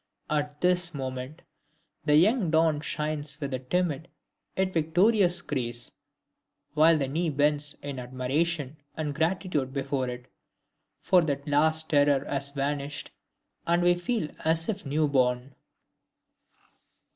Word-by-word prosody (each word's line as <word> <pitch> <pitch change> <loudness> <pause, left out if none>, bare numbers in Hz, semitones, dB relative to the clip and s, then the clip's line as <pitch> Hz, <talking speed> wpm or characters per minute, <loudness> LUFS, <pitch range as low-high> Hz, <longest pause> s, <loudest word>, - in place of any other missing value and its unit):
At 150 -1 -2
this 180 -2 +2
moment 130 +3 -5 0.6
the 150 -1 +4
young 195 - +4
dawn 160 -2 +3
shines 150 -1 -2
with 140 -2 -4
a 130 - -1
timid 160 +3 -1 0.5
yet 190 0 +1
victorious 180 +4 +3
grace, 120 -4 -4 0.8
while 160 +2 +5
the 140 -3 -1
knee 165 +5 -1
bends 145 0 +1
in 140 -2 -5
admiration 135 +4 -2 0.2
and 150 -2 -2
gratitude 160 -4 -1
before 135 -2 -1
it, 125 0 -7 0.8
for 185 -2 +4
the 145 -4 -1
last 155 +2 +2
terror 145 -2 +3
has 140 0 -2
vanished, 140 0 -3 0.6
and 170 +1 +3
we 175 0 +5
feel 175 0 -2
as 165 +1 +2
if 200 -8 -3
new 150 +2 +1
born. 130 -1 +1
150 Hz, 125 wpm, -27 LUFS, 140-165 Hz, 0.8 s, while